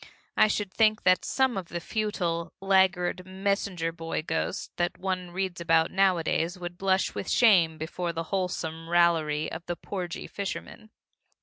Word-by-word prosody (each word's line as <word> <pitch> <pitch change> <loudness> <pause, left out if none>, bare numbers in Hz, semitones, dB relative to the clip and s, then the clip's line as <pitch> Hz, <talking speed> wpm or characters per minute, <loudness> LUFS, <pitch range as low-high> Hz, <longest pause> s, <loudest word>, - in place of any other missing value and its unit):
I - - +6
should 205 -2 -2
think 215 -1 +3
that 185 0 +4
some 265 -4 +1
of 185 -3 -4
the 175 - -4
futile, 170 -4 -2
laggard 190 -2 +2
messenger 190 -2 -1
boy 165 -1 -4
ghosts 160 0 -2
that 175 0 -1
one 185 -1 -3
reads 180 -1 -3
about 165 0 +3
nowadays 180 -2 +1
would 175 -1 -6
blush 190 +1 +1
with - - -5
shame 175 -9 +5
before 170 +2 -3
the 165 0 -3
wholesome 165 -3 -2
raillery 165 -3 +2
of 170 - -6
the 175 - -2
porgy 180 -2 -5
fisherman. 200 +2 -6
180 Hz, 150 wpm, -27 LUFS, 165-195 Hz, -, I